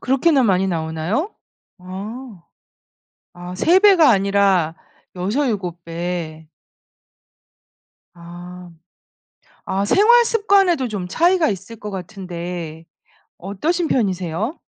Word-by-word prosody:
그렇게나 270 +2 +2
많이 195 -3 +2
나오나요? 165 - -2 0.4
아. 200 +3 -8 0.9
아 175 +1 -9
3 340 - +4
배가 380 -7 +6
아니라 195 -5 +2 0.4
6-7 190 - -2
배. 165 -2 -5 1.7
아. 175 +1 -11 1.0
아 195 +1 -1
생활 470 - +5
습관에도 390 - +2
좀 200 -5 -5
차이가 340 - +2
있을 195 +4 -6
것 210 -1 -8
같은데 175 -4 -7 0.5
어떠신 310 - -2
편이세요? 195 - -1
195 Hz, 175 characters per minute, -20 LUFS, 175-270 Hz, 1.7 s, 배가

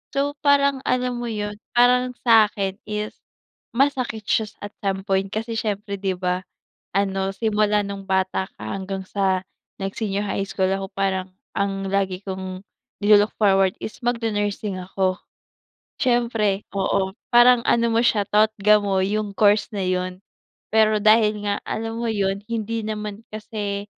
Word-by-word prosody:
So, 285 +1 +1
parang 280 -2 +3
alam 250 -1 0
mo 240 - -3
'yun, 210 -1 -4 0.2
parang 250 +1 +4
sa'kin 210 -4 +3
is 210 0 -3 0.6
masakit 255 -5 +1
siya 220 -1 +2 0.2
at 205 - -6
some 195 -1 -2
point, 195 0 0
kasi, 225 +1 -3
siyempre 200 -2 -3
'di 190 -2 -1
ba, 180 0 -1 0.5
ano 195 -1 0
simula 210 -2 +1
nung 200 -1 -7
bata 190 0 0
ka 105 - -11
hanggang 190 0 -4
sa 190 -2 0 0.4
nag 195 0 -2
senior 205 -2 -1
high 195 0 -2
school 190 -1 0
ako 195 0 -2
parang 190 -1 -1 0.2
ang 195 -1 -1
lagi 195 -1 0
kong 190 0 -6 0.4
ni-lu-look 210 0 +5
forward 195 -3 +4
is 220 - -6
mag 240 0 +2
nu-nursing 205 -2 -1
ako. 185 0 -1 0.8
Siyempre, 230 -5 +1 0.2
oo, 190 0 0 0.2
parang 240 0 +7
ano 235 0 +3
mo 230 - +3
siya, 205 -3 +2
totga 210 0 +4
mo, 195 -2 +1
yung 205 +1 -1
course 205 +1 +3
na 200 - -2
'yun. 185 0 -2 0.5
Pero, 215 -1 +4
dahil 215 -1 +4
nga 200 - 0
alam 225 +1 -3
mo - - -2
'yun 200 -2 0
hindi 230 0 -2
naman 210 -1 -4
kasi 205 -2 -4
205 Hz, 150 wpm, -23 LUFS, 195-220 Hz, 0.8 s, parang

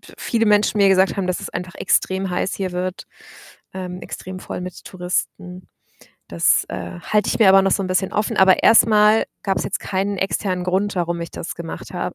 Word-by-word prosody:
p - - -16
viele 225 -1 0
Menschen 210 0 +3
mir 200 - +5
gesagt 190 0 +3
haben, 195 -2 -1
dass 185 - -2
es - - -7
einfach 180 +1 -6
extrem 190 0 0
heiß 180 +1 -2
hier 190 -2 -4
wird, 180 +1 -4 0.7
ähm, 180 -1 -6
extrem 185 0 -8
voll - - -6
mit 180 -1 -9
Touristen. 180 0 -5 0.6
Das, 85 0 +2
äh, 85 -1 -7
halte 210 - 0
ich - - -1
mir 215 -4 +6
aber 195 0 +7
noch 195 - +1
so 195 - +1
'n - - -3
bisschen 185 +1 -1
offen, 210 0 -1
aber 190 -1 +5
erst 225 - +6
mal 215 0 +4 0.2
gab's 195 -1 -1
jetzt - - -3
keinen 195 +1 -2
externen 185 -1 -2
Grund, 190 +3 0
warum 170 -1 -1
ich 170 - -6
das - - -6
gemacht 170 -1 -8
habe. - - -3
185 Hz, 210 wpm, -20 LUFS, 180-200 Hz, 0.7 s, aber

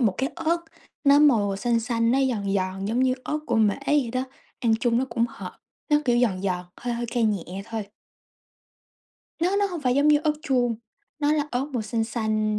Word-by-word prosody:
một 215 -6 +2
cái 270 +1 0
ớt, 335 0 0 0.5
nó 280 0 +6
màu 220 -10 +4
xanh 235 +2 +1
xanh, 230 0 0
nó 265 - +3
giòn 200 -4 -2
giòn 190 0 -2
giống 230 +5 0
như 260 0 +3
ớt 300 - -1
của 235 - +1
Mễ 210 -2 +3
vậy 285 -6 +2
đó, 255 - 0 0.4
ăn 230 -3 +3
chung 240 -1 +2
nó 260 - +1
cũng 230 0 +1
hợp, - - -9 0.3
nó 295 - +5
kiểu 240 -2 +3
giòn 195 -6 +1
giòn, 180 -2 -1
hơi 240 -1 -3
hơi 235 0 -3
cay 240 -2 +1
nhẹ 195 -2 -2
thôi. 225 -2 -5 1.5
Nó 365 +4 +2
nó 405 0 +2
hông 350 -5 -5
phải 250 -3 +1
giống 285 +2 +3
như 300 -1 +6
ớt 305 - +3
chuông, 245 -6 +1 0.4
nó 295 0 +2
là 300 -1 +1
ớt 250 +2 0
màu 240 -4 -1
xanh 225 +1 -1
xanh. 215 -2 -1
235 Hz, 215 wpm, -25 LUFS, 215-270 Hz, 1.5 s, nó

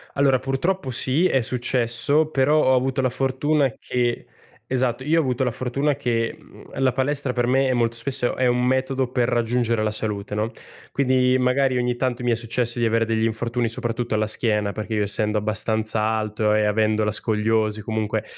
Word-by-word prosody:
Allora, 135 -2 +3
purtroppo 135 +3 -1
sì. 135 +8 +1
È 135 -6 +2
successo, 125 +5 0
però 150 +2 +3
ho 130 - +4
avuto 130 +1 0
la 130 - +1
fortuna 135 +1 0
che 120 -1 -2 0.4
esatto. 130 -1 -1
Io 160 +3 +2
ho - - +4
avuto 130 -2 -1
la 125 - +1
fortuna 135 +5 -1
che, 120 -4 -1
mhmm, - - -12
la 130 -1 +3
palestra 135 +1 -1
per 120 0 0
me 135 +1 +3
è 130 - +2
molto 115 -1 0
spesso 120 +1 -2
è 130 - 0
un 125 0 +2
metodo 130 0 0
per 125 -2 +1
raggiungere 120 -1 +1
la 110 - +1
salute, 105 -1 -4
no? 110 +2 -1 0.4
Quindi 130 -1 +2
magari 130 +1 +2
ogni 125 0 0
tanto 125 -1 -2
mi 120 - +1
è - - +3
successo 120 +1 -2
di 120 - +1
avere 115 0 +2
degli 110 0 0
infortuni, 115 +1 -1
soprattutto 120 0 -3
alla 110 0 +1
schiena 105 -2 0
perché 110 +2 -5
io 105 - +1
essendo 105 +1 0
abbastanza 110 +1 -1
alto 110 -1 0
e 105 0 +2
avendo 110 +1 +1
la 105 - 0
scoliosi 110 0 0
comunque, 110 0 -2
120 Hz, 190 wpm, -23 LUFS, 110-130 Hz, 0.4 s, ho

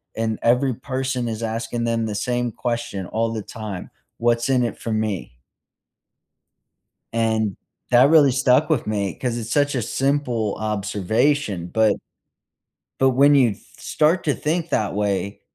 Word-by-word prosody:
and 110 -1 -1
every 125 +2 +3
person 130 -1 -3
is 110 -1 -4
asking 115 +1 -2
them 115 -1 0
the 110 - -3
same 120 +2 -1
question 120 -5 -3
all 115 +1 -1
the 110 - -3
time. 105 -5 -7 0.3
'What's 120 0 +2
in 130 -2 +3
it 120 - -3
for 115 - -4
me?'" 105 - -3 1.8
And 110 -3 0 0.3
that 125 +3 +6
really 150 -4 +6
stuck 135 +4 +3
with 145 -7 +1
me 100 -3 -1
'cause 125 -2 -3
it's 115 -1 -5
such 145 -1 +2
a 125 - 0
simple 125 -4 -1
observation, 105 - 0
but 110 -1 +3 1.0
but 135 0 +5
when 140 +3 +5
you 125 -5 +4
th - - -14 0.2
start 160 +4 +1
to 145 - +1
think 165 +2 -2
that 105 -3 0
way, 100 -1 -1
115 Hz, 150 wpm, -22 LUFS, 110-130 Hz, 1.8 s, that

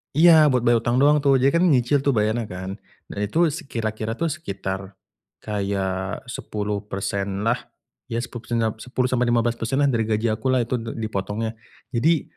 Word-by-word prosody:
iya 160 -1 +7
buat 125 -2 +1
bayar 120 -1 +4
utang 120 +1 +1
doang 150 +1 +6
tuh. 140 -1 +5
Jadi 135 +1 +4
kan 170 - +4
nyicil 135 -1 +3
tuh 140 - +3
bayarnya 110 +2 +1
kan. 95 0 -6 0.4
Nah, - - -6
itu 105 +10 -4
se 165 +4 -5
kira-kira 110 -1 -2
tuh 165 -1 +1
sekitar 95 -10 -4 0.6
kaya 100 -2 -2 0.6
10% 100 -1 -3
lah. 120 +2 +2 0.5
ya, 115 +1 -2
10% 120 0 -5
da 110 - +1
10%-15% 125 0 0
lah - - +4
dari 115 -3 0
gaji 110 +1 +1
aku 110 +4 -2
lah 130 -2 +3
itu 120 +1 -2
d 115 0 -6
dipotongnya. 110 0 -3 0.4
Jadi 150 +6 +2
115 Hz, 165 wpm, -23 LUFS, 105-130 Hz, 0.6 s, iya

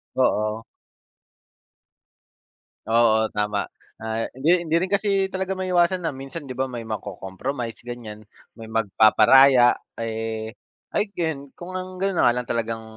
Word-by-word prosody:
Oo. 110 +1 +1 2.2
Oo, 110 -1 +4
tama. 105 -1 -1 0.3
Ah, 110 0 -3
hindi 170 +7 +2
hindi 160 0 0
rin 185 - -1
kasi 200 -1 +1
talaga 190 0 -3
maiiwasan 180 -1 +1
na 140 - -3
minsan, 135 +2 -8
'di 130 - -6
ba 130 0 -2
may 115 -2 -6
maco-compromise 110 +4 -5
ganyan, 115 -3 -8 0.3
may 110 -1 -10
magpaparaya, 120 +4 +5 0.2
eh, 110 0 -4 0.4
I - - +3
can 155 -7 -3
kung 185 +2 -9
ang 185 0 -6
gano'n 195 -1 0
na - - +3
nga 120 - +5
lang 125 - -6
talagang 115 -1 -2
120 Hz, 135 wpm, -23 LUFS, 110-170 Hz, 2.2 s, magpaparaya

